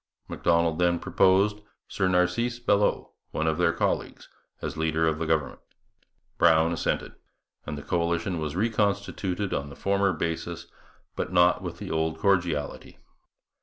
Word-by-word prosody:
Macdonald 85 -1 +1
then 85 -1 +3
proposed 100 +4 +2 0.3
Sir 95 - 0
Narcisse 90 +7 +1
Belleau, 105 -4 +1 0.2
one 80 - -2
of 80 +1 0
their 90 -1 +4
colleagues, - - -2 0.3
as - - -5
leader 80 0 +1
of 80 -1 0
the 85 - -2
government. 80 -5 -1 0.8
Brown 80 0 +5
assented; 85 - -2 0.5
and 75 0 -4
the 75 - -7
coalition 85 +2 -1
was 75 0 -4
reconstituted 100 -2 -1
on 70 0 -2
the 70 - -11
former 100 0 +1
basis, 85 +1 -4 0.5
but - - -3
not 90 0 +4
with - - -6
the - - -7
old 80 0 -1
cordiality. 85 -7 -1
85 Hz, 140 wpm, -26 LUFS, 80-95 Hz, 0.8 s, Brown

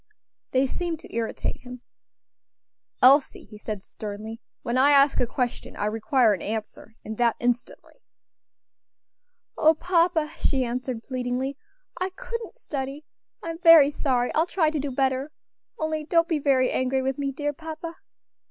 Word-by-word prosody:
They 260 +1 +2
seemed 335 +4 -3
to - - -12
irritate 230 -1 -2
him. 250 -1 -10 1.2
"Elsie," 275 +2 +5
he 210 - -13
said, 210 -2 -5
sternly, 215 +2 -7 0.2
"when 235 - -2
I 265 +3 +5
ask 280 0 +5
a 245 - +1
question, 245 0 -3
I - - -2
require 225 +2 +2
an 190 - -4
answer, 220 +1 -6
and 220 +1 -6
that 235 -2 +3
instantly." 245 0 -3 1.6
"O 315 +1 +5
papa!" 335 -2 +1
she 265 -3 +1
answered, 245 -1 -4
pleadingly, 255 +1 -3 0.4
"I 370 +1 -1
couldn't 465 +3 -6
study. 285 - -5 0.4
I'm 330 0 -5
very 330 -5 +8
sorry 255 -4 0
I'll 320 +2 +2
try 325 -4 +1
to 310 - -2
do 285 +1 -2
better 265 +2 0 0.5
only 315 -1 -2
don't 335 +2 +2
be 320 -3 0
very 265 -3 +2
angry 260 +1 0
with 265 +1 -2
me, 275 -1 -1
dear 290 +2 -3
papa." 325 +2 -7
270 Hz, 150 wpm, -25 LUFS, 245-315 Hz, 1.6 s, very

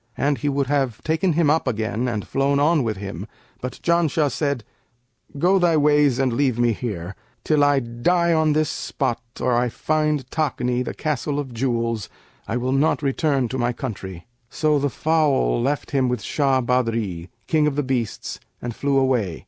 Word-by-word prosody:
And 140 0 +1
he 145 - 0
would 140 0 0
have 135 -4 0
taken 160 +3 +1
him 155 -2 +3
up 160 -2 +1
again 115 +1 -1
and 110 -4 -3
flown 140 +1 +1
on 155 +1 +3
with 110 -4 -2
him; 100 0 -6 0.3
but 125 0 -5
Janshah 165 -4 +2
said, 140 -4 -1 0.7
'Go 185 +6 +3
thy 170 -3 +3
ways 145 -3 +4
and 130 -2 +1
leave 130 -1 +1
me 120 -1 +3
here; 100 -6 -5 0.3
till 150 -2 +3
I 145 -1 +4
die 170 +9 +1
on 155 -1 +3
this 155 0 +1
spot 120 -4 -2 0.2
or 125 - +1
I 120 +1 +2
find 150 0 0
Takni, 125 -5 0
the - - -5
Castle 145 -1 -2
of 135 -4 -4
Jewels, 115 -3 -1 0.4
I 115 - -1
will 125 +1 -1
not 145 +3 +2
return 140 -2 +1
to 130 - -3
my 120 0 +1
country.' 95 -8 -6 0.2
So 150 -2 +1
the 145 +1 0
fowl 150 - +1
left 140 +4 -1
him 130 -3 +2
with 125 -3 -2
Shah 135 -3 +1
Badri, 115 -8 -1 0.2
King 155 -2 +2
of 145 - -1
the 145 - 0
Beasts 125 -4 -3 0.2
and 120 -1 -5
flew 140 -1 0
away. 125 -10 +1
135 Hz, 180 wpm, -22 LUFS, 120-150 Hz, 0.7 s, ways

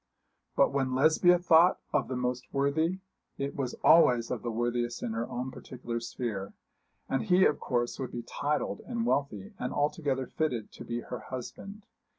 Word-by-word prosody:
But - - +4
when 135 -2 0
Lesbia 160 +6 +5
thought 175 0 +5
of 145 - +1
the 130 - -3
most 125 0 -3
worthy, 160 +7 0 0.4
it 140 0 -3
was 130 -3 -3
always 130 -6 +5
of 125 -4 -2
the 120 - -3
worthiest 120 +1 -1
in 115 - -2
her 115 +1 -3
own 125 +2 -4
particular 120 -3 -6
sphere; 115 -4 -4 0.5
and 135 - 0
he 185 -2 +4
of 150 - +2
course 120 -2 -1
would 130 - -4
be 120 - -5
titled 145 +5 -2
and 235 -2 -2
wealthy, 135 - -1
and 125 - -2
altogether 145 -3 0
fitted 125 -7 -2
to - - -10
be 120 0 -4
her 125 - -6
husband. 195 - -7
130 Hz, 170 wpm, -29 LUFS, 120-155 Hz, 0.5 s, Lesbia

